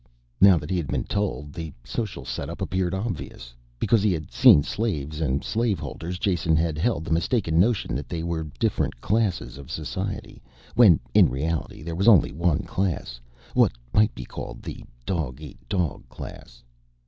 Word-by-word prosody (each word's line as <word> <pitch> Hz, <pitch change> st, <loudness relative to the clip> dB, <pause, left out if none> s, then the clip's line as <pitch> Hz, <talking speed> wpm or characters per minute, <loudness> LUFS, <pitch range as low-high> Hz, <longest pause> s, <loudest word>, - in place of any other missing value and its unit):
Now 95 Hz, -2 st, +8 dB
that 75 Hz, +3 st, -5 dB
he 95 Hz, -, +1 dB
had 80 Hz, -5 st, -2 dB
been -, -, -1 dB
told, 95 Hz, -8 st, -2 dB
the 80 Hz, -2 st, -6 dB
social 110 Hz, -4 st, -4 dB
setup -, -, -5 dB
appeared 95 Hz, -1 st, -1 dB
obvious. 75 Hz, -, -5 dB, 0.2 s
Because 110 Hz, -, +3 dB
he 105 Hz, -1 st, +3 dB
had 80 Hz, -2 st, -5 dB
seen 115 Hz, -, +7 dB
slaves 75 Hz, -7 st, -2 dB
and 70 Hz, -2 st, 0 dB
slave 115 Hz, -3 st, 0 dB
holders, 90 Hz, +2 st, -5 dB
Jason 90 Hz, -5 st, +1 dB
had 80 Hz, 0 st, +1 dB
held 100 Hz, -3 st, 0 dB
the -, -, -5 dB
mistaken 85 Hz, -1 st, +1 dB
notion 105 Hz, -, +2 dB
that 70 Hz, +3 st, -4 dB
they 85 Hz, -2 st, -3 dB
were 85 Hz, -2 st, -2 dB
different -, -, 0 dB
classes 100 Hz, -, 0 dB
of 70 Hz, -, -11 dB
society, -, -, -5 dB, 0.3 s
when 110 Hz, -9 st, +7 dB
in -, -, +6 dB
reality 75 Hz, +5 st, -3 dB
there 85 Hz, +1 st, -4 dB
was 95 Hz, +6 st, 0 dB
only 100 Hz, -9 st, +6 dB
one 85 Hz, +1 st, +1 dB
class, 80 Hz, -10 st, -2 dB, 0.3 s
what -, -, +4 dB, 0.2 s
might 105 Hz, +1 st, +4 dB
be -, -, -7 dB
called -, -, -8 dB
the -, -, -7 dB, 0.2 s
dog 75 Hz, -5 st, -2 dB
eat 75 Hz, -4 st, -10 dB
dog 90 Hz, -8 st, -2 dB
class. -, -, -10 dB
85 Hz, 170 wpm, -25 LUFS, 75-100 Hz, 0.3 s, Now